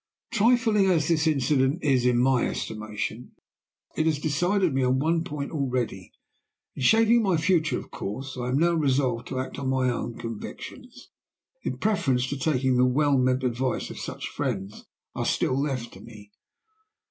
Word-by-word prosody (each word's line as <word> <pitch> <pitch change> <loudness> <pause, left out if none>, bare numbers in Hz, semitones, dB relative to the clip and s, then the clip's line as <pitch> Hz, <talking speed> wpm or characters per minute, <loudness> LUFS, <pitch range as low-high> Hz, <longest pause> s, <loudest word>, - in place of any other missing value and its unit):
"Trifling 225 -2 +3
as 165 -4 +2
this 160 -1 +2
incident 140 +1 +1
is 130 -4 +3
in 125 -1 +3
my 125 0 +3
estimation, 110 +2 -5 0.6
it 155 - +1
has 155 -2 +2
decided 175 +4 +1
me 135 - +1
on 130 0 +2
one 165 +4 +1
point 150 -5 -5
already. 125 - -2 0.6
In - - -7
shaping 225 - +5
my 190 -6 +2
future 160 -1 +1
course 130 +7 -6
I 125 -1 -4
am 130 - +1
now 170 +3 +3
resolved 135 -6 +1
to 130 - -4
act 130 +2 -5
on 135 -2 -2
my 130 -1 +1
own 120 -1 -4
convictions 235 - -8 0.5
in - - -3
preference 135 -12 +1
to 140 - -3
taking 130 -3 +1
the 125 - +5
well 145 +2 +2
meant 130 +1 +1
advice 125 +1 -1
of - - -8
such - - -5
friends 95 +2 -3
as - - -14 0.3
are - - -3
still 130 +2 +1
left 130 -5 -3
to - - -12
me. 105 -3 -13
135 Hz, 170 wpm, -26 LUFS, 125-160 Hz, 0.6 s, shaping